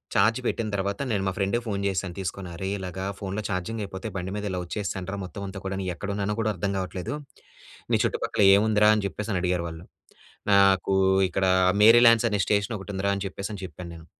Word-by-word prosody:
Charge 110 +5 +4
పెట్టిన 115 -1 -1
తర్వాత, 100 0 -2
నేను 100 -3 0
మా - - +1
ఫ్రెండ్‌కు 100 +4 0
ఫోన్ 100 -2 -2
చేశాను 95 -2 -2
తీసుకొని. 95 -1 -4
అరే 95 +3 -4
ఇలాగా 95 0 -5
ఫోన్‌లో 100 +1 -3
ఛార్జింగ్ 100 +4 -3
అయిపోతే, 95 +2 -6
బండి 95 0 -4
మీద 105 0 -4
ఇలా 90 -1 -2
వచ్చేసానురా. 95 0 -4
మొత్తం 90 +2 -8
అంతా 95 0 -7
కూడా 95 0 -2
నేను 95 -1 -2
ఎక్కడున్నానో 100 +2 -2
కూడా 110 -1 +1
అర్థం 100 -1 -2
కావట్లేదు, 95 +5 -4 0.8
"నీ - - +4
చుట్టుపక్కల - - 0
ఏముందిరా"? 105 0 +4
అని 105 -2 -1
చెప్పేసి 105 +3 -5
అని 90 - 0
అడిగారు 90 -1 0
వాళ్ళు. 80 0 -8 0.7
నాకు 100 -1 +4 0.4
ఇక్కడ 95 +2 0 0.4
మేరీల్యాండ్స్ 115 +1 +7
అనే 105 - 0
స్టేషన్ 100 +2 0
ఒకటి 95 +1 -8
ఉందిరా, 100 +1 0
అని 100 - -4
చెప్పేసి 100 +2 -6
అని 100 -2 -7
చెప్పాను 90 +1 -9
నేను, 80 -1 -12
100 Hz, 195 wpm, -26 LUFS, 95-105 Hz, 0.8 s, మేరీల్యాండ్స్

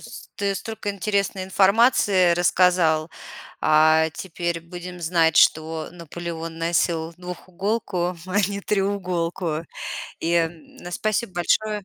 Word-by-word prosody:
с - - -11
ты 200 -1 0
столько 210 +1 -4
интересной 200 -1 -1
информации 195 -2 +4
рассказал. 175 -3 +3 0.5
А, 155 +1 +4
теперь 170 -1 -4
будем 175 +1 -9
знать, 165 -2 +2
что 160 0 +3
Наполеон 170 -1 -7
носил 165 0 0
двухуголку, 180 +1 -3
а 185 +2 -1
не 200 0 -4
треуголку. 180 -5 -1 0.6
И, 165 +1 -1
м, 165 -1 -2
спасибо 215 +1 -1
большое! 210 +3 0
175 Hz, 105 wpm, -23 LUFS, 165-195 Hz, 0.6 s, информации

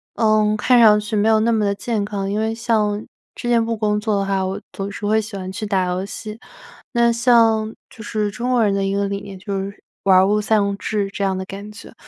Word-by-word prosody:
嗯 215 -1 +2
看 245 +3 +4
上 210 -2 +7
去 210 +1 -4
没 210 +2 +2
有 220 -1 +4
那 230 +1 +2
么 220 -2 +1
地 200 - +1
健 215 -1 -2
康。 200 -1 -3
因 205 - -1
为 220 0 0
像 215 -2 0 0.4
之 - - -6
前 235 -1 +3
不 230 -1 -2
工 210 -1 0
作 210 -2 0
的 195 - -1
话， 195 -1 0
我 195 +2 -3
总 200 0 -5
是 205 - -6
会 220 +1 +2
喜 210 -2 -7
欢 185 0 -6
去 215 +3 -5
打 190 -3 +1
游 180 +1 -2
戏。 215 +2 -8 0.5
那 235 -1 +3
像 230 -2 +3
就 220 - -12
是 210 -2 -1
中 245 +4 -3
国 240 -2 +3
人 205 - +2
的 195 0 0
一 195 0 -1
个 200 0 0
理 200 0 -3
念 200 -1 -9
就 195 +1 -4
是 195 +1 -6 0.2
玩 190 -1 +6
儿 190 - +5
物 210 +1 +2
丧 205 -2 +1
志 205 -2 -2
这 200 - -3
样 190 -1 0
的 190 - -4
感 200 +2 -8
觉。 215 - -12
210 Hz, 275 characters per minute, -20 LUFS, 200-220 Hz, 0.5 s, 上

